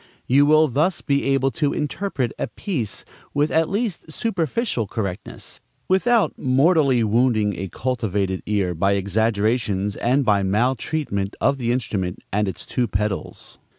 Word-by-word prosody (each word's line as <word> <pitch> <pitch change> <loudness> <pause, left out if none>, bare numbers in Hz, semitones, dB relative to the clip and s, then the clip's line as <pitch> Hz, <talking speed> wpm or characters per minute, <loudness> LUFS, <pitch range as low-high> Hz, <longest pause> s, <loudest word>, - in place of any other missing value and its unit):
You 140 +3 +4
will 155 +1 +5
thus 155 +8 +1
be 140 -2 0
able 135 0 +2
to 145 0 0
interpret 150 - -2
a - - -1
piece 130 - -4 0.3
with 145 +2 +2
at 160 0 +2
least 200 -6 -2
superficial 175 - -1
correctness, 100 -2 -5 0.3
without 225 +4 +3
mortally 135 -1 +3
wounding 110 -2 +2
a 95 - -3
cultivated 100 -7 -1
ear 100 -4 0
by 95 +4 +1
exaggerations 105 0 0
and 130 +3 +1
by 105 -3 +3
maltreatment 110 +1 -1
of 140 - +2
the 120 -1 0
instrument 100 -8 -2 0.2
and 105 0 +1
its 95 - -6
two 125 -1 -1
pedals. 105 0 -4
120 Hz, 140 wpm, -22 LUFS, 105-145 Hz, 0.3 s, will